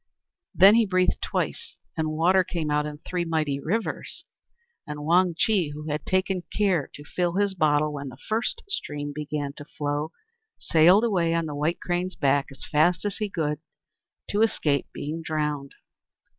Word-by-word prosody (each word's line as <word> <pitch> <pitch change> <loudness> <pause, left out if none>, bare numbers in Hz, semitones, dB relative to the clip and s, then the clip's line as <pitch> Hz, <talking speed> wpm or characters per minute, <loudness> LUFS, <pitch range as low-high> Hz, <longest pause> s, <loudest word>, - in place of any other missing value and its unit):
Then 195 +3 +8
he 225 -1 +4
breathed 185 -1 +1
twice, - - -3 0.2
and 160 -1 0
the 155 0 -3
water 185 +3 +4
came 165 -4 -3
out 150 0 +1
in 150 -1 -7
three 180 -1 -1
mighty 155 -4 -1
rivers, 215 +11 -3 0.6
and 150 0 -6
Wang 175 +1 +3
Chih, 180 -9 +2
who 150 +1 -6
had 150 0 -4
taken 185 0 +1 0.2
care 190 -8 +2
to 145 - -10
fill 175 +3 -1
his 200 0 +1
bottle 150 -3 +2
when 140 -1 -5
the 130 - -12
first 235 - -2
stream 145 - -3
began 145 -1 -4
to 150 - -9
flow, 145 +1 -2 0.5
sailed 175 +6 +5
away 175 -7 +2
on 165 -1 0
the 150 - -5
White 150 +4 -1
Crane's 180 +1 -2
back 140 -1 +2
as 135 -1 -10
fast 170 +5 +2
as 205 -1 -1
he 210 -1 -2
could, 150 -5 -2 0.7
to 205 - +1
escape 150 -10 +1
being 155 +3 -5
drowned. 150 -3 -2
160 Hz, 170 wpm, -26 LUFS, 150-185 Hz, 0.7 s, Then